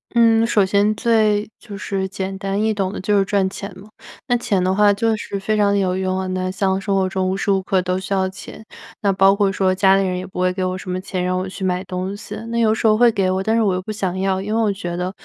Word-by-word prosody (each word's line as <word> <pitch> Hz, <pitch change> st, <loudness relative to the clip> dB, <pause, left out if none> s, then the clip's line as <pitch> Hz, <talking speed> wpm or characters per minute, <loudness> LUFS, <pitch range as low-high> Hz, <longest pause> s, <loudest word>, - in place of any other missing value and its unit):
嗯， 230 Hz, -1 st, +5 dB
首 215 Hz, -3 st, +3 dB
先 200 Hz, +2 st, +2 dB
最 215 Hz, -2 st, +1 dB
就 210 Hz, -4 st, -10 dB
是 195 Hz, -1 st, -3 dB
简 190 Hz, 0 st, -5 dB
单 195 Hz, +1 st, -2 dB
易 220 Hz, 0 st, +2 dB
懂 195 Hz, -2 st, -2 dB
的 -, -, -5 dB
就 205 Hz, +2 st, +1 dB
是 195 Hz, -, +3 dB
赚 195 Hz, -1 st, +1 dB
钱 200 Hz, +1 st, -8 dB
嘛， 205 Hz, +3 st, -14 dB, 0.4 s
那 245 Hz, -2 st, +2 dB
钱 210 Hz, -6 st, 0 dB
的 185 Hz, +1 st, +1 dB
话 205 Hz, 0 st, +5 dB
就 225 Hz, +2 st, +1 dB
是 200 Hz, -1 st, -5 dB
非 215 Hz, +2 st, -1 dB
常 200 Hz, -1 st, +3 dB
有 185 Hz, -2 st, 0 dB
用 185 Hz, 0 st, -1 dB
啊。 190 Hz, -, -3 dB
那 185 Hz, 0 st, -2 dB
像 190 Hz, 0 st, 0 dB
生 195 Hz, 0 st, -1 dB
活 190 Hz, -1 st, +1 dB
中 190 Hz, -1 st, -1 dB
无 185 Hz, -, 0 dB
时 200 Hz, -, -3 dB
无 195 Hz, -1 st, +2 dB
刻 190 Hz, 0 st, +1 dB
都 185 Hz, 0 st, -1 dB
需 195 Hz, +1 st, -4 dB
要 190 Hz, -1 st, +1 dB
钱， 190 Hz, +3 st, -11 dB, 0.4 s
那 200 Hz, -, +2 dB
包 195 Hz, +1 st, +4 dB
括 200 Hz, -1 st, +2 dB
说 190 Hz, -1 st, +1 dB
家 190 Hz, +1 st, +4 dB
里 195 Hz, -, +2 dB
人 180 Hz, -1 st, -2 dB
也 185 Hz, -, -7 dB
不 185 Hz, -, -8 dB
会 185 Hz, 0 st, +1 dB
给 185 Hz, 0 st, -3 dB
我 185 Hz, 0 st, -2 dB
什 185 Hz, 0 st, -7 dB
么 185 Hz, 0 st, -3 dB
钱， 185 Hz, -1 st, -3 dB
让 185 Hz, 0 st, 0 dB
我 185 Hz, +1 st, -4 dB
去 190 Hz, -, -8 dB
买 185 Hz, 0 st, 0 dB
东 185 Hz, +2 st, -4 dB
西。 205 Hz, -, -8 dB
那 235 Hz, 0 st, -1 dB
有 220 Hz, -1 st, +3 dB
时 225 Hz, -, -4 dB
候 215 Hz, -1 st, +5 dB
会 240 Hz, +1 st, +5 dB
给 195 Hz, -4 st, 0 dB
我， 190 Hz, 0 st, 0 dB
但 220 Hz, +3 st, 0 dB
是 230 Hz, -, +3 dB
我 200 Hz, -3 st, +2 dB
又 185 Hz, -, -2 dB
不 200 Hz, -, -6 dB
想 190 Hz, -3 st, -3 dB
要， 190 Hz, 0 st, 0 dB
因 205 Hz, +3 st, -4 dB
为 230 Hz, -, +2 dB
我 215 Hz, -2 st, +2 dB
觉 175 Hz, -3 st, -5 dB
得 180 Hz, +1 st, -3 dB
195 Hz, 315 characters per minute, -20 LUFS, 185-210 Hz, 0.4 s, 嗯